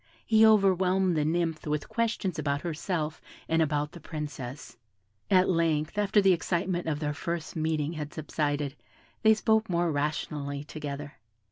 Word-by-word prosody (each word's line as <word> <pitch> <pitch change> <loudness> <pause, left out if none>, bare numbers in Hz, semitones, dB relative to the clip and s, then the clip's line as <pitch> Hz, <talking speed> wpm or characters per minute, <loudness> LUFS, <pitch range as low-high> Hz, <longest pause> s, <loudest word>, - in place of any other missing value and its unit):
He 220 0 +5
overwhelmed 190 -4 +4
the 150 - +2
nymph 165 0 -1
with 150 -1 -1
questions 220 -6 -1
about 140 -1 -1
herself 160 -1 -3 0.3
and 165 0 +2
about 150 -1 0
the 175 - -11
Princess. 145 -5 -7 0.5
At 185 -1 +5
length, 165 -2 +1
after 205 0 +3
the 195 -1 +5
excitement 175 0 -1
of 150 -2 -1
their 150 -1 -1
first 170 +1 -4
meeting 155 -1 -1
had 150 -2 -5
subsided, 145 -2 -2 0.5
they 220 0 +6
spoke 220 0 +2
more 170 -1 +1
rationally 145 -1 -2
together. 145 -1 -7
160 Hz, 145 wpm, -28 LUFS, 150-185 Hz, 0.5 s, they